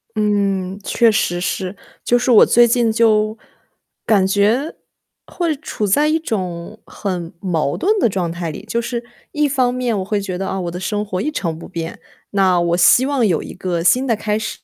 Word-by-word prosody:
嗯， 200 -2 0
确 230 -2 +3
实 175 -4 0
是。 185 +1 -3 0.3
就 245 - +2
是 250 +1 +1
我 220 - +8
最 240 0 +5
近 235 -1 +2
就 220 -1 +2 0.7
感 195 -4 +3
觉， 215 +10 +1 0.5
会 335 -4 -2
处 220 -7 -4
在 290 +10 +3
一 315 +1 +2
种 190 - -5
很 180 -4 -5
矛 165 -7 -1
盾 425 +4 +1
的 235 - +3
状 180 -3 -2
态 170 -2 -4
里。 205 - -9
就 230 +2 -1
是 235 0 -4 0.3
一 300 0 +1
方 255 -3 +1
面 245 -3 -1
我 - - -2
会 205 +1 -1
觉 190 -2 -4
得， 190 - -3
啊， 190 - -3
我 170 -1 -4
的 180 - -6
生 210 +2 -2
活 185 -2 -3
一 305 - -1
成 165 - -3
不 170 - -10
变， 165 -2 -6 0.3
那 190 -3 +3
我 170 0 +1
希 245 +8 +5
望 275 -4 +1
有 175 -7 +1
一 - - -8
个 175 -2 -3
新 255 +8 +3
的 230 -4 +1
开 210 0 -1
始， 215 - -5
新 - - -41
210 Hz, 220 characters per minute, -19 LUFS, 185-240 Hz, 0.7 s, 我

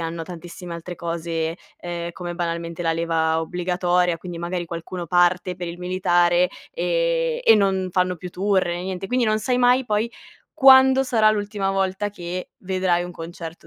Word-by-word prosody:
hanno 165 0 -4
tantissime 175 0 -8
altre 170 +1 -7
cose, 165 -1 -3 0.2
ehm, 170 -1 -5
come, 175 0 -6
banalmente, 170 0 -3
la 165 -1 +1
leva 160 -1 0
obbligatoria. 180 0 0
Quindi, 175 -1 -7
magari 175 0 -3
qualcuno 170 +1 -6
parte 180 +1 +2
per 175 -1 -5
il 170 +1 -7
militare, 180 -1 +2 0.2
e - - 0
e 225 - +7
non 190 -2 +1
fanno 180 0 +1
più 180 +2 -7
tour 195 +1 +1
né 175 +1 -3
niente. 190 0 -4
Quindi 250 +1 +1
non 215 0 +2
sai 250 +2 0
mai, 250 +1 +3
poi, 215 +2 0 0.4
quando 265 -2 +7
sarà 220 -4 +4
l'ultima 205 -2 -1
volta 195 +1 -1
che 180 -1 -6
vedrai 185 -2 0
un 180 - -7
concerto 165 0 -9
180 Hz, 165 wpm, -23 LUFS, 170-200 Hz, 0.4 s, e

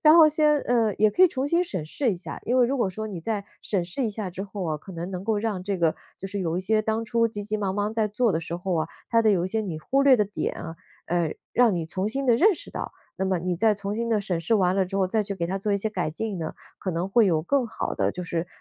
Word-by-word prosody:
然 305 0 +8
后 325 -2 +9
先 300 -1 +3
呃， 230 -5 +1
也 215 0 +4
可 360 - +3
以 - - +6
重 265 -3 -2
新 340 +3 +3
审 185 - -4
视 240 - 0
一 - - -4
下。 175 - -7
因 245 - +1
为 250 - +6
如 270 +2 -1
果 220 - +2
说 215 +4 -5
你 185 -5 -6
再 205 +2 -2 0.2
审 190 -4 -1
视 185 +10 -2
一 - - +1
下 205 -3 -4
之 185 +2 -5
后 200 0 -6
哦， - - -4
可 190 - -11
能 170 +1 -5
能 185 0 -5
够 220 -1 +1
让 205 -4 -2
这 200 0 -1
个 165 -3 +1 0.2
就 195 - -5
是 200 +1 -4
有 170 -2 -1
一 - - 0
些 215 +3 +2
当 220 +1 -1
初 230 +1 +2
急 205 -2 -5
急 210 +1 -2
忙 195 -3 -1
忙 205 +1 -1
在 220 -1 +1
做 225 +3 +1
的 160 - +1
时 165 +1 -5
候 180 0 -2
啊， 160 0 -1 0.2
它 230 - +4
的 220 - +4
有 180 -3 +1
一 - - -2
些 220 +3 0
你 190 -7 -4
忽 270 - +1
略 270 -2 +7
的 210 - +3
点 205 +1 -3
啊， 165 -1 -7 0.3
呃， 170 -2 0 0.2
让 240 -5 +4
你 170 -2 -2
重 185 +5 -2
新 275 +5 -2
地 240 -2 +5
认 395 - +5
识 - - -10
到， - - -5 0.2
那 190 - -1
么 190 -1 +1
你 180 0 -1
再 215 +4 +3
重 200 0 -4
新 230 +1 -2
地 220 -2 +2
审 185 -5 -2
视 175 +7 +1
完 185 -3 +3
了 190 -1 +2
之 195 +2 -4
后， 195 -1 +2
再 220 +2 +1
去 200 - -4
给 170 -3 -2
它 190 +2 -1
做 205 +1 -1
一 - - +3
些 215 +2 -2
改 180 -6 -2
进 210 +2 -3
呢， 160 -1 -4 0.2
可 185 - -3
能 170 +3 -2
会 220 +2 +4
有 160 -4 +2
更 260 - +1
好 225 - -4
的 - - 0
就 180 - -5
是， 170 -1 -2
205 Hz, 330 characters per minute, -25 LUFS, 180-225 Hz, 0.3 s, 后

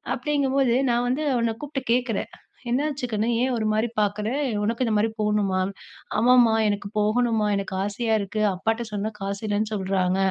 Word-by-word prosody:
அப்படிங்கும்போது 275 -4 +1 0.2
நா 235 - +2
வந்து 285 +5 0
அவன 230 -2 0
கூப்ட்டு 275 -2 -4
கேட்கிறே 245 -4 0 0.5
"என்னாச்சுக்கணு 250 -5 -1
ஏ - - +3
ஒரு 215 - -1
மாதிரி 220 +2 +1
பார்க்குற. 210 +1 -1 0.4
உனக்கு 230 +4 0
இந்த 220 - 0
மாதிரி 220 +2 +2
போணுமா?" 205 -3 +1 0.6
"ஆமாம்மா 240 -1 +5
எனக்கு 200 0 -2
போகணுமா 220 0 +2
எனக்கு 195 -1 -4
ஆசையா 220 +2 -1
இருக்கு 205 +2 -3
அப்பாட்ட 225 +5 -1
சொன்னா 210 +2 -2
காசு 200 +2 -4
இல்லன்னு 210 +1 -1
சொல்றாங்க," 190 -1 0
220 Hz, 150 wpm, -24 LUFS, 205-245 Hz, 0.6 s, ஆமாம்மா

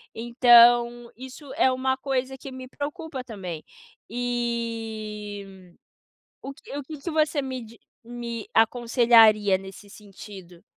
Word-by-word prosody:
então 240 0 +5
isso 260 +2 -11
é 260 - +3
uma 260 +1 0
coisa 265 0 -3
que 270 +1 -10
me 260 0 -9
preocupa 295 0 -6
também. 185 -9 -7 0.5
Eh, 220 -5 -5 0.7
o 275 - -7
que 275 - -10
o 290 - -5
que 305 +3 -9
que 335 +5 -5
você 305 -1 +1
me 260 -2 -5
di 230 +1 -16 0.3
me 235 -1 -7
aconselharia 225 -3 +4
nesse 195 +2 -12
sentido? 195 -4 -13
240 Hz, 125 wpm, -25 LUFS, 215-260 Hz, 0.7 s, então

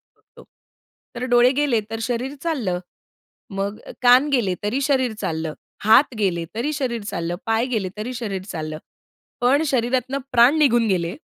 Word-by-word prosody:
बघतो. - - -19 0.7
तर 245 +1 -3
डोळे 245 +1 +6
गेले 275 -4 +1
तर 225 - -3
शरीर 250 +4 -2
चाललं. 240 - -1 0.7
मग 200 +1 -3 0.2
कान 250 +3 +6
गेले 230 -10 +1
तरी 240 +7 -1
शरीर 260 -4 +1
चाललं. 160 -1 -3 0.3
हात 225 +6 +5
गेले 175 -5 0
तरी 265 +7 -1
शरीर 255 -5 -2
चाललं. 170 -4 -3
पाय 225 +1 +1
गेले 215 -7 -2
तरी 225 +4 -4
शरीर 205 -5 -4
चाललं. 155 -5 -5 0.6
पण 270 +5 +3
शरीरातनं 255 +1 0
प्राण 250 +5 +5
निघून 240 -6 +4
गेले, 175 -4 -1
235 Hz, 150 wpm, -22 LUFS, 195-260 Hz, 0.7 s, डोळे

